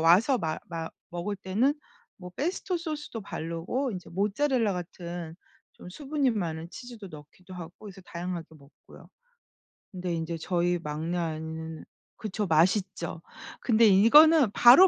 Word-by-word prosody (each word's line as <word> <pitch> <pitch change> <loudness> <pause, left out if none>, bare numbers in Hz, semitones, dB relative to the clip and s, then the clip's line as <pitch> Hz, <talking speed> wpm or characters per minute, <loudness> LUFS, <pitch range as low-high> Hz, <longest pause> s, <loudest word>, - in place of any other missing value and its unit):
와서 195 - +5
마 155 -1 -2
마 165 -1 -4 0.2
먹을 175 +4 -3
때는 210 +9 +1 0.4
뭐 180 -3 -9
pesto 355 +4 -1
소스도 300 -8 -5
바르고 185 - -3
이제 180 -2 -7
모차렐라 215 +4 +1
같은 175 -2 -6 0.4
좀 - - -12
수분이 280 +3 0
많은 170 -6 -3
치즈도 240 -5 -9
넣기도 155 +4 -13
하고 170 -2 -8
그래서 200 -2 -10
다양하게 175 -1 -5
먹고요. 140 0 -17 0.8
근데 180 -2 -3
인제 165 0 -2
저희 175 +1 0
막내 160 +3 -3
아이는 160 -1 -4 0.3
그쵸 210 -1 -3
맛있죠. 170 +1 +1 0.4
근데 230 -1 +4
이거는 265 +7 +7
바로 250 - +9
185 Hz, 305 characters per minute, -28 LUFS, 165-230 Hz, 0.8 s, 바로